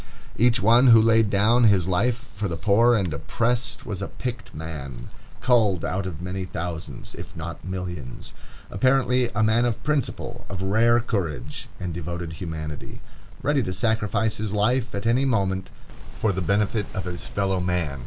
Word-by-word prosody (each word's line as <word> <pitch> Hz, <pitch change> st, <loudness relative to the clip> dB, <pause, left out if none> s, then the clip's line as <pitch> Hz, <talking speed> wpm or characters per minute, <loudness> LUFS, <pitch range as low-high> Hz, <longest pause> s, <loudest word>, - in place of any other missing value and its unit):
Each 120 Hz, +3 st, +3 dB
one 120 Hz, +5 st, +5 dB
who 115 Hz, -2 st, +9 dB
there 115 Hz, 0 st, +4 dB
laid 110 Hz, -2 st, +3 dB
down 110 Hz, +5 st, +4 dB
his 100 Hz, -5 st, +4 dB
life 115 Hz, +7 st, +1 dB
for 105 Hz, +1 st, -2 dB
the 85 Hz, -2 st, -4 dB
poor 115 Hz, +6 st, +4 dB
and 95 Hz, -7 st, 0 dB
oppressed 115 Hz, -, -1 dB
was 100 Hz, -5 st, -4 dB
a 95 Hz, -, -2 dB
picked 125 Hz, -2 st, -6 dB
man, 75 Hz, -6 st, -7 dB, 0.3 s
culled 110 Hz, -9 st, +3 dB
out 95 Hz, +2 st, -2 dB
of 85 Hz, -2 st, -6 dB
many 95 Hz, +1 st, -3 dB
thousands, 85 Hz, -6 st, -6 dB
if -, -, -10 dB
not 85 Hz, +1 st, -6 dB
millions; 90 Hz, -8 st, -6 dB, 0.4 s
apparently 125 Hz, +2 st, +2 dB
a 110 Hz, -, +2 dB
man 110 Hz, +2 st, +3 dB
of 120 Hz, -3 st, -1 dB
principle, 120 Hz, -4 st, -2 dB
of 95 Hz, -1 st, -4 dB
rare 115 Hz, +5 st, +4 dB
courage, 85 Hz, -, -3 dB
and 90 Hz, -2 st, -4 dB
devoted 85 Hz, 0 st, -5 dB
humanity, 80 Hz, -3 st, -6 dB, 0.4 s
ready 145 Hz, -1 st, +2 dB
to 95 Hz, -5 st, -3 dB
sacrifice 110 Hz, +1 st, 0 dB
his 110 Hz, -1 st, -3 dB
life 115 Hz, +4 st, +1 dB
at 100 Hz, -, -4 dB
any 120 Hz, +4 st, +3 dB
moment 95 Hz, -7 st, 0 dB, 0.5 s
for 110 Hz, -, +1 dB
the 95 Hz, 0 st, -2 dB
benefit 100 Hz, +3 st, +1 dB
of 95 Hz, -, -3 dB
his 90 Hz, -1 st, -5 dB
fellow 95 Hz, -1 st, 0 dB
man. 90 Hz, -6 st, -1 dB
100 Hz, 170 wpm, -24 LUFS, 90-115 Hz, 0.5 s, who